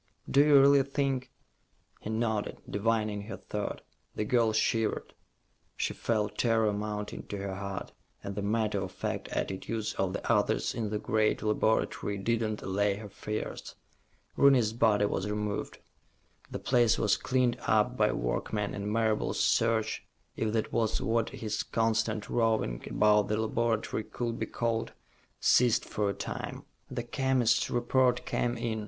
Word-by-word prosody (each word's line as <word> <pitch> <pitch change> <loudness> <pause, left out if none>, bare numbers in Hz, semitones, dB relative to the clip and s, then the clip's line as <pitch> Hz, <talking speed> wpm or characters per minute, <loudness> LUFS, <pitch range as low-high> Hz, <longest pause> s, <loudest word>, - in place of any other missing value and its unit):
"Do 140 - +5
you 145 -2 +7
really 140 0 +6
think 135 -1 -1 0.4
...?" - - -38
He - - -6
nodded, 110 -1 -1
divining 105 0 0
her - - -6
thought. 105 -1 -4 0.3
The 105 - -1
girl 115 0 +3
shivered. 110 0 0 0.6
She - - -1
felt 110 -2 -1
terror 115 -3 +3
mounting 105 0 -4
to 100 - -4
her 100 0 -4
heart, 100 0 -5 0.3
and 100 - -4
the 100 - -3
matter 110 +1 0
of - - -4
fact - - -3
attitudes 105 +3 -3
of 95 -1 -1
the - - -4
others - - +2
in 110 -3 -2
the 105 - -1
great 110 +1 +1
laboratory 105 -1 0
did 115 +4 0
not 110 -1 -2
allay 100 +1 +1
her 105 0 -8
fears. 105 +2 -5 0.6
Rooney's 130 -6 +5
body 110 -3 +3
was 100 0 -2
removed. 105 -1 -3 0.7
The - - -4
place 120 -3 +3
was 105 - +3
cleaned 125 -2 +1
up 110 +3 +3
by 105 -3 +3
workmen, 100 - -2
and 100 +1 -3
Marable's 110 -1 0
search 115 -1 +1 0.3
if 110 -1 -1
that 110 -1 -1
was 110 -2 +1
what 115 0 0
his 110 -1 -3
constant 115 -1 0
roving 110 - 0
about 105 -1 +4
the 105 - 0
laboratory 110 0 0
could 115 0 -4
be - - -2
called 115 -1 -2 0.5
ceased 120 -2 +4
for 105 -1 -1
a - - -1
time. - - -5 0.3
The - - -3
chemist's 125 -2 +1
report 125 +1 +2
came 120 0 -1
in. 115 -1 -2
110 Hz, 155 wpm, -30 LUFS, 105-115 Hz, 0.7 s, you